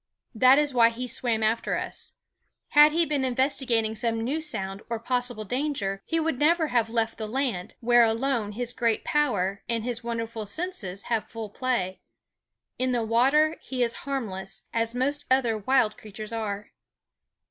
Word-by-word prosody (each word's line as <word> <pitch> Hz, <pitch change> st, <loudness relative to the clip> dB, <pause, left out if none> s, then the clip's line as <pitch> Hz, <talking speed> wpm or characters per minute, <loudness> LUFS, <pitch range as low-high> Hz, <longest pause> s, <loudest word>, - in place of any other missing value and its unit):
That 255 Hz, +4 st, +6 dB
is 295 Hz, -2 st, +2 dB
why 230 Hz, -2 st, +6 dB
he 245 Hz, +2 st, -5 dB
swam 235 Hz, -3 st, 0 dB
after 220 Hz, +2 st, +1 dB
us. -, -, -6 dB, 0.6 s
Had 295 Hz, 0 st, +7 dB
he 335 Hz, +2 st, +2 dB
been 290 Hz, -3 st, 0 dB
investigating 250 Hz, -3 st, +1 dB
some 225 Hz, +1 st, -1 dB
new 270 Hz, +8 st, -1 dB
sound 200 Hz, -10 st, -3 dB
or 230 Hz, -, -1 dB
possible 245 Hz, -2 st, -1 dB
danger, 245 Hz, -6 st, -2 dB
he 330 Hz, -, +1 dB
would 320 Hz, -5 st, -1 dB
never 320 Hz, +1 st, +3 dB
have 235 Hz, -2 st, +1 dB
left 225 Hz, -1 st, -1 dB
the 215 Hz, -, -3 dB
land, 225 Hz, -6 st, -2 dB
where 240 Hz, 0 st, +5 dB
alone 225 Hz, -2 st, 0 dB
his 245 Hz, +2 st, -3 dB
great 230 Hz, -3 st, 0 dB
power 200 Hz, -10 st, 0 dB
and 230 Hz, -2 st, 0 dB
his 240 Hz, 0 st, -4 dB
wonderful 230 Hz, -2 st, -4 dB
senses 200 Hz, -, -2 dB
have 230 Hz, -2 st, -2 dB
full 220 Hz, -2 st, -7 dB
play. 210 Hz, -7 st, -2 dB, 0.8 s
In 255 Hz, 0 st, +1 dB
the 240 Hz, -2 st, +1 dB
water 275 Hz, +8 st, +3 dB
he 255 Hz, -2 st, -2 dB
is 235 Hz, -1 st, 0 dB, 0.2 s
harmless, 195 Hz, -8 st, -3 dB
as 230 Hz, +1 st, 0 dB
most 280 Hz, +3 st, 0 dB
other 255 Hz, -4 st, +3 dB
wild 215 Hz, 0 st, +1 dB
creatures 215 Hz, +1 st, -9 dB
are. 210 Hz, -2 st, -4 dB
235 Hz, 165 wpm, -26 LUFS, 220-265 Hz, 0.8 s, Had